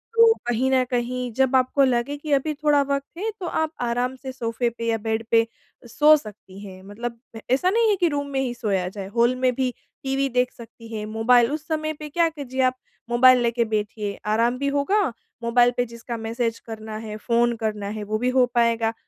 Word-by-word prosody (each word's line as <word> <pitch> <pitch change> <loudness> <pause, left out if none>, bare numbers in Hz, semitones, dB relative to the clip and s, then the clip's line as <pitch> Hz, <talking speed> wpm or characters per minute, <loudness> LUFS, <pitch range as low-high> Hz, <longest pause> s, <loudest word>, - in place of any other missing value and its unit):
तो 460 0 +7
कहीं 245 +2 +1
न 260 -1 +4
कहीं 245 0 -2
जब 265 +2 +2
आपको 260 +2 +3
लगे 255 +2 +1
कि 295 0 -7
अभी 280 +3 +1
थोड़ा 295 -1 +2
वक़्त 280 +3 -3
है, 435 +4 -2
तो 370 - -5
आप 315 -2 -1
आराम 245 +2 -1
से 260 0 -7
सोफ़े 235 -1 -2
पे 230 0 -7
या 225 - +1
बेड 220 +1 -2
पे 230 0 +5 0.4
सो 300 +6 +6
सकती 205 -5 -12
हैं। 185 -1 -11
मतलब 230 +4 -6 0.3
ऐसा 275 +8 +3
नहीं 450 +3 +3
है 415 - +3
कि 355 -2 +2
रूम 285 -1 -2
में 270 - -1
ही 255 -2 -1
सोया 195 -6 -1
जाए, 195 0 -7
हॉल 235 +4 +2
में 255 0 +1
भी 260 -1 0 0.3
टीवी 270 0 0
देख 250 0 +1
सकती 230 0 -13
हैं, 210 0 -4
मोबाइल, 230 +3 +3
उस 305 0 -5
समय 310 -1 -1
पे 300 0 -9
क्या 335 +2 +2
कीजिए 265 -4 -4
आप, 255 0 +2 0.3
मोबाइल 250 +1 +6
लेके 235 0 +1
बैठिए। 210 -1 -3
आराम 230 +3 +1
भी 280 +2 -2
होगा, 395 +9 +2 0.4
मोबाइल 240 +1 +4
पे 245 - +2
जिसका 235 0 -7
मैसेज 230 +1 -2
करना 220 -1 -8
है, 215 -1 -6
फ़ोन 235 +1 +1
करना 210 -2 -3
है, 210 - -4
वो 215 +1 -2
भी 250 +2 +1
हो 255 -1 +4
पाएगा। 230 -1 +2
245 Hz, 210 wpm, -23 LUFS, 225-275 Hz, 0.4 s, तो